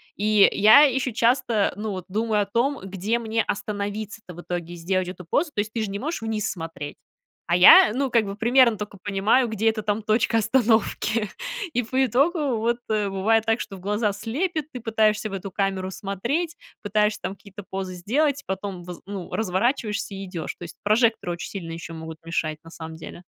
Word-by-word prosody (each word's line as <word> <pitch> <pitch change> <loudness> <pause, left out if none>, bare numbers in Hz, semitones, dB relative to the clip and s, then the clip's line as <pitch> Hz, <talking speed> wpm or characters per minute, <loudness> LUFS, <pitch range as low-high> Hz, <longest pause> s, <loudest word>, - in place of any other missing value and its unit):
И 210 0 +5
я 215 +8 +7
ещё 265 -2 +2
часто, 235 -2 +2
ну, 210 +1 -4
вот 185 -2 -5
думаю 215 +2 0
о - - 0
том, 245 +7 0
где 195 +4 -2
мне 225 -1 0
остановиться-то 205 0 -4
в 175 - -9
итоге, 175 -1 -5
сделать 185 +2 -1
эту 180 -1 -8
позу. 305 - +1
То - - -3
есть 210 +1 -1
ты 230 - -1
же 205 - -3
не 200 - -4
можешь 305 0 -3
вниз 220 -2 -2
смотреть, 160 -4 -7 0.5
а 170 - +2
я, 180 +3 +9
ну, 270 +1 0
как 230 -2 +3
бы 200 0 -5
примерно 235 +1 +4
тока 210 -1 -7
понимаю, 205 +6 +2
где 220 0 +1
эта 220 -1 -2
там 210 +1 -1
точка 220 +2 +2
остановки. 225 -1 +1 0.4
И 245 - +1
по 260 +4 +1
итогу, 280 - +1
вот 235 +2 0
бывает 210 +1 +1
так, 225 +1 +1
что 195 - -7
в - - -13
глаза 210 +2 0
слепят, 310 - -2
ты 250 - -5
пытаешься 220 -1 +1
в - - -9
эту 195 0 -5
камеру 195 -1 -1
смотреть, 240 - -2 0.3
пытаешься 210 +1 +1
там 195 - -4
какие-то 200 0 -12
позы 190 -1 -4
сделать, 280 - 0
потом 190 -1 -5
воз 175 0 -9
ну, 195 -2 -7
разворачиваешься 215 +1 -1
и 195 0 -6
идёшь. 170 -4 -5
То - - -10
есть 170 - -9
прожекторы 220 -2 +2
очень 170 - -6
сильно 175 -5 -6
ещё 165 0 -7
могут 160 0 -8
мешать 155 -2 -2
на 165 - -12
самом 160 -1 -8
деле. 165 +2 -10
210 Hz, 195 wpm, -24 LUFS, 190-230 Hz, 0.5 s, я